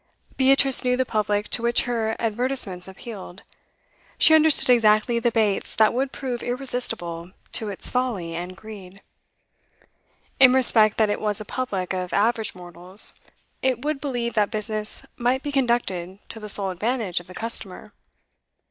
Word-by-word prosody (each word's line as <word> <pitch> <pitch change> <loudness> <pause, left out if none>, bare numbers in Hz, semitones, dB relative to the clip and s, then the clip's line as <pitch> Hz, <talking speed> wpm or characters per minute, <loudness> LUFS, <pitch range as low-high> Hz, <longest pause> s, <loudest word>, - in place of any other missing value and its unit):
Beatrice 270 0 +5
knew 250 0 +1
the 260 - +1
public 210 -2 -1
to - - -1
which 235 0 +2
her 225 -3 -1
advertisements 225 -5 -1
appealed; 190 -2 -10 0.7
she 315 - +5
understood 315 -4 +5
exactly 225 0 +3
the 240 - +1
baits 215 -4 0
that 220 -1 +4
would 265 +2 -1
prove 250 -3 -5
irresistible 225 -9 -3 0.2
to 220 - -1
its 195 - -4
folly 230 -10 -2
and 175 +2 -6
greed. 195 -3 -12 1.4
In 255 -2 +8
respect 225 -5 +5
that 215 -2 +2
it - - -3
was 210 -2 -1
a 215 - -7
public 200 -7 -3
of 180 -1 -4
average 220 0 0
mortals, 180 +2 -4 0.5
it 260 0 0
would 300 -2 -2
believe 245 -5 -3
that 210 -2 +1
business 215 0 -5
might 250 +2 0
be 290 - -3
conducted 235 -9 -1
to 225 - -7
the 210 -1 -8
sole 195 -1 -1
advantage 210 0 -1
of 175 - -14
the 185 - -12
customer. 215 -3 -1
220 Hz, 155 wpm, -23 LUFS, 195-250 Hz, 1.4 s, In